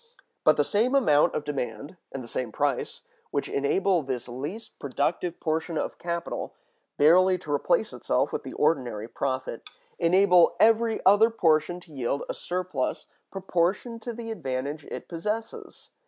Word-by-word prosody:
But 155 - +5
the 145 - +4
same 225 - +1
amount 150 - +4
of 150 - -1
demand 140 +1 -4 0.2
and 135 - -6
the - - -9
same 120 0 -3
price, 140 +1 -1 0.3
which - - -2
enable 180 +6 +1
this 130 -4 -4
least 145 - -6
productive 155 +5 -2
portion 160 0 -1
of - - -3
capital 170 0 -4 0.4
barely 185 +5 +5
to 155 -4 -8
replace 485 - +1
itself - - 0
with - - -2
the - - -8
ordinary 120 -8 0
profit, 130 -1 -3 0.3
enable 180 0 +5
every 225 0 +3
other 205 +4 +6
portion 170 -5 +2
to 165 -3 -17
yield 135 +1 -2
a - - -3
surplus 180 -7 -3 0.2
proportioned 190 +5 -1
to 240 - -4
the 230 0 -6
advantage 140 -4 -4
it - - -7
possesses. 210 +6 -5
165 Hz, 150 wpm, -27 LUFS, 140-195 Hz, 0.4 s, other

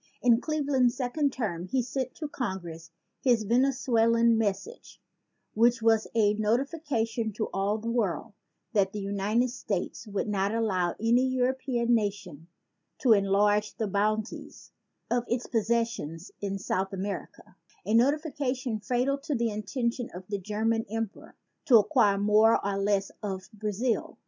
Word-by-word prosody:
In 240 -1 +5
Cleveland's 280 -6 +1
second 275 +3 0
term 185 -9 -3
he 255 +6 0
sent 260 +1 -4
to 305 - -5
Congress 175 - -5 0.3
his 240 -4 +2
Venezuela 235 -1 +2
message, 225 - 0 0.5
which 230 +1 +3
was 225 -1 +3
a 210 -2 +4
notification 230 0 -1
to 220 - -3
all 200 +2 0
the 230 +2 -4
world 215 -3 -1 0.4
that 195 -3 +2
the 210 - -4
United 205 +5 0
States 215 -1 -4
would 205 0 -2
not 200 +1 0
allow 185 -6 0
any 230 +3 +3
European 255 -1 0
nation 200 -8 -2 0.5
to 245 -5 +5
enlarge 205 +1 +2
the 220 - -2
boundaries 215 +2 -2 0.4
of 240 0 +2
its 240 +1 -1
possessions 225 -7 -1
in 195 -1 -2
South 190 0 -2
Am 190 +1 -3
a 205 +1 -7
notification 265 -2 +1
fatal 255 +5 0
to 290 +1 -3
the 235 -1 0
intention 235 +4 -2
of 180 - -7
the 200 -1 -2
German 220 +3 0
Emperor 225 -1 -5 0.3
to 245 - +7
acquire 210 -2 +3
more 210 +2 +4
or 200 0 0
less 200 -1 0
of 190 -3 -5
Brazil. 215 +3 -2
225 Hz, 140 wpm, -28 LUFS, 200-245 Hz, 0.5 s, to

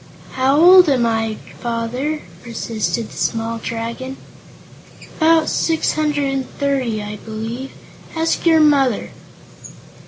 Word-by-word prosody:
"How 265 +3 +2
old 360 0 +8
am 255 -4 +2
I, 225 -1 0 0.2
Father?" 245 +6 -3 0.2
persisted 230 -1 -3
the - - -12
small 230 0 -2
Dragon. 230 +4 -5 1.0
"About 320 0 +4
six 325 -1 +1
hundred 295 -2 0
and 265 -1 -3
thirty, 260 -7 -1
I 210 0 -6
believe. 225 +5 -6 0.5
Ask 325 0 0
your 320 -1 +5
mother." 275 -6 +2
260 Hz, 115 wpm, -19 LUFS, 230-300 Hz, 1.0 s, old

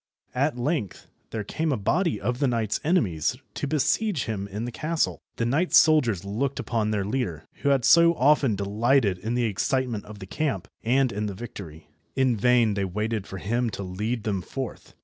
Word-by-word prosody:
At 135 +1 0
length 125 - -2 0.2
there 110 -2 -4
came 155 +9 -2
a 135 - +1
body 115 - 0
of 120 +5 -2
the 140 - +2
knight's 115 -4 0
enemies 125 - +1 0.2
to 145 - -3
besiege 155 - +1
him 100 -3 -4
in 105 +3 -5
his 120 - -6
castle. 160 +4 -1
The 115 - -1
knight's 150 +10 +3
soldiers 120 - +4
looked 125 +8 -2
upon 110 -3 -1
their 105 -2 -1
leader, 100 - -3
who 140 - 0
had 135 -3 +2
so 170 0 +6
often 140 -5 +3
delighted 105 +1 +1
in 110 +5 -2
the 120 -1 +1
excitement 120 +1 -1
of 105 0 -10
the 100 - -8
camp, 115 - -2 0.2
and 130 +2 +2
in 105 +1 -2
the 100 - -5
victory. 90 -8 -9 0.3
In 130 -3 +2
vain 120 0 +3
they 100 -1 -1
waited 105 +2 -2
for 95 - -7
him 115 +5 -1
to 100 - -6
lead 105 +5 -3
them 100 -3 -1
forth. 130 +7 -7
115 Hz, 190 wpm, -25 LUFS, 100-135 Hz, 0.3 s, so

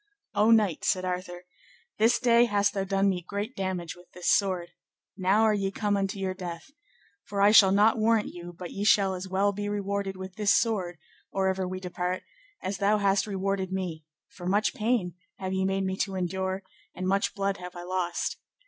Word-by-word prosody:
O 215 +2 +3
knight, 215 -7 +3
said 185 -1 +1
Arthur, 180 -1 -4 0.5
this 225 +2 +4
day 240 -1 +5
hast 205 -3 +1
thou 195 - -1
done 195 0 +1
me 185 -2 0
great 205 +7 -5
damage 185 -3 -3
with 175 0 -17
this 180 0 0
sword; 185 -4 +1 0.5
now 195 +3 +3
are 220 -1 +4
ye 195 -2 0
come 205 +1 -1
unto 195 +1 -1
your 190 -1 -2
death, 175 +3 -7 0.5
for 200 - -4
I 200 +1 +6
shall 200 -3 +8
not 210 +3 +4
warrant 220 -1 +2
you 175 0 -8
but 175 0 -8
ye 200 - -4
shall 200 -2 +4
as 185 +1 -5
well 195 +2 +2
be 205 +1 -3
rewarded 200 -1 -2
with 190 0 -8
this 210 -1 +4
sword, 190 -7 0 0.3
or 190 -1 +1
ever 190 -1 -1
we 185 0 -4
depart, 180 0 -3 0.4
as 190 0 -3
thou 205 +1 +3
hast 200 0 +2
rewarded 195 -1 -2
me; 180 -4 -3 0.2
for 175 - -9
much 205 +3 +2
pain 215 -5 0 0.2
have 190 0 -4
ye 190 0 0
made 195 0 0
me 190 0 -1
to 195 -1 -1
endure, 190 +1 -2 0.3
and 185 0 -3
much 195 +1 +1
blood 200 0 -1
have 180 0 -9
I 175 - -7
lost. 180 -1 -2
195 Hz, 200 wpm, -28 LUFS, 185-205 Hz, 0.5 s, shall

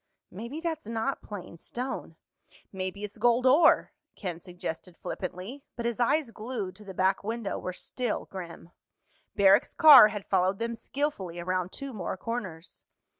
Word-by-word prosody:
"Maybe 235 - -6
that's 320 -7 -3
not 230 +4 -2
plain 185 -5 -8
stone—maybe 200 -5 -7
it's 210 +1 -7
gold 240 +2 +3
ore," 300 +5 +5 0.2
Ken 180 -5 -5
suggested 175 -1 -7
flippantly, 190 +9 -6
but 235 - -4
his 235 0 -1
eyes 255 +1 +2
glued 215 -4 -5
to 215 - -12
the 190 -2 -9
back 190 +2 +2
window 225 -1 -3
were 185 - -4
still 240 +5 -3
grim. 175 -2 -9 0.6
Barrack's 200 0 +5
car 300 -8 +10
had 205 -2 -6
followed 190 0 +2
them 230 +2 -2
skillfully 230 - -3
around 185 +1 -1
two 275 -2 -7
more 185 -3 -4
corners. 185 -7 -6
210 Hz, 145 wpm, -28 LUFS, 185-240 Hz, 0.6 s, car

